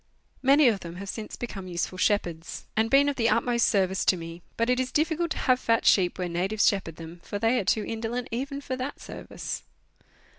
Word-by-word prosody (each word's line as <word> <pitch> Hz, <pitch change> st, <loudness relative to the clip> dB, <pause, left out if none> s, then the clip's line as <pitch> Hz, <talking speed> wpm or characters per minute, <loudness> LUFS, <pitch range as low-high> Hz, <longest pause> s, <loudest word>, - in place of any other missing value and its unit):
Many 275 Hz, +2 st, +6 dB
of 215 Hz, -4 st, +3 dB
them 170 Hz, -1 st, -8 dB
have 195 Hz, +2 st, -7 dB
since 220 Hz, +1 st, -5 dB
become 195 Hz, -6 st, -6 dB
useful 180 Hz, +1 st, -3 dB
shepherds, 175 Hz, -5 st, -1 dB
and 220 Hz, +1 st, +2 dB
been 275 Hz, +2 st, +5 dB
of 285 Hz, -, -1 dB
the 230 Hz, -2 st, +3 dB
utmost 235 Hz, 0 st, +2 dB
service 190 Hz, -1 st, +1 dB
to 185 Hz, -, +4 dB
me, 165 Hz, +1 st, -8 dB, 0.2 s
but 230 Hz, -, +1 dB
it 250 Hz, 0 st, +2 dB
is 255 Hz, 0 st, -1 dB
difficult 325 Hz, +3 st, +1 dB
to -, -, -3 dB
have 255 Hz, -1 st, +2 dB
fat 230 Hz, -2 st, +1 dB
sheep 180 Hz, -3 st, +4 dB
where 180 Hz, -1 st, -2 dB
natives 185 Hz, +5 st, +1 dB
shepherd 185 Hz, -5 st, 0 dB
them, 165 Hz, +1 st, -10 dB
for 205 Hz, -, -4 dB
they 230 Hz, +4 st, +2 dB
are 195 Hz, -, -3 dB
too 210 Hz, +2 st, +1 dB
indolent 230 Hz, +2 st, -3 dB
even 275 Hz, +4 st, -3 dB
for 260 Hz, -2 st, -3 dB
that 260 Hz, +3 st, -5 dB
service. -, -, -6 dB
220 Hz, 215 wpm, -27 LUFS, 185-255 Hz, 0.2 s, Many